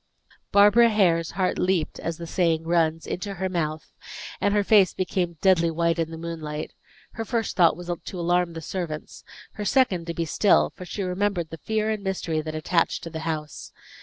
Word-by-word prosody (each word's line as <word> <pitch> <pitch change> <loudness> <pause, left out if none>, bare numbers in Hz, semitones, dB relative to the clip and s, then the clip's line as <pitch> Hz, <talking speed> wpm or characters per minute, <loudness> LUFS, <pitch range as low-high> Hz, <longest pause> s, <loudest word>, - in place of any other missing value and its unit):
Barbara 210 +4 +6
Hare's 170 -6 +2
heart 185 -2 0
leaped, 180 -4 0
as 165 -1 -4
the 170 - -7
saying 165 -2 +1
runs, 165 -1 +1
into 195 +2 -4
her 190 +1 -2
mouth, 155 -3 -3 0.5
and 205 - +2
her 205 0 +2
face 200 -2 +4
became 180 -2 -2
deadly 180 -3 +4
white 170 +1 0
in 165 -1 0
the 165 - -7
moonlight. 160 -2 -5 0.4
Her 225 - -5
first 225 -1 -2
thought 170 -3 +4
was 175 0 -5
to 185 - -6
alarm 175 0 +1
the 165 - -6
servants; 160 -2 -6 0.3
her 210 - -6
second, 195 -8 +2
to 170 - -4
be 165 - -1
still; 200 +5 +3
for 180 - -9
she 195 +3 -4
remembered 180 -2 -1
the 165 - -7
fear 220 +5 -1
and 215 -2 -3
mystery 175 -5 -2
that 155 0 -6
attached 165 +2 0
to 165 - -7
the 160 - -5
house. 155 -1 -5
175 Hz, 190 wpm, -25 LUFS, 165-195 Hz, 0.5 s, Barbara